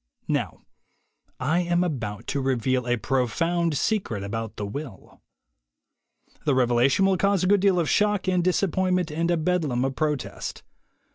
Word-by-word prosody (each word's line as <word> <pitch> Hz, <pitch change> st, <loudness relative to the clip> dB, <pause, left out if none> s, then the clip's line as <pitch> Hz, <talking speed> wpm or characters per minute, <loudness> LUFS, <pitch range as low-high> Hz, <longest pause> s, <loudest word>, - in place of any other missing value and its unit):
Now -, -, -2 dB, 0.8 s
I 155 Hz, +7 st, +1 dB
am 175 Hz, 0 st, +1 dB
about 115 Hz, -, -4 dB
to 140 Hz, -, -1 dB
reveal 130 Hz, -1 st, 0 dB
a 120 Hz, 0 st, +1 dB
profound 160 Hz, +7 st, 0 dB
secret 155 Hz, -, -1 dB
about 115 Hz, +2 st, -4 dB
the 105 Hz, -, -4 dB
will. 120 Hz, 0 st, -8 dB, 1.2 s
The 140 Hz, -, +2 dB
revelation 125 Hz, +7 st, +3 dB
will 195 Hz, -1 st, +3 dB
cause 195 Hz, -1 st, +2 dB
a -, -, +2 dB
good 205 Hz, +1 st, +4 dB
deal 190 Hz, -2 st, +3 dB
of 165 Hz, -, 0 dB
shock 210 Hz, 0 st, +1 dB
and 180 Hz, -2 st, +2 dB
disappointment 185 Hz, -1 st, +1 dB
and 165 Hz, +3 st, -1 dB
a 175 Hz, -, +2 dB
bedlam 155 Hz, -7 st, 0 dB
of 135 Hz, 0 st, -2 dB
protest. 150 Hz, -2 st, -3 dB
155 Hz, 150 wpm, -25 LUFS, 125-180 Hz, 1.2 s, good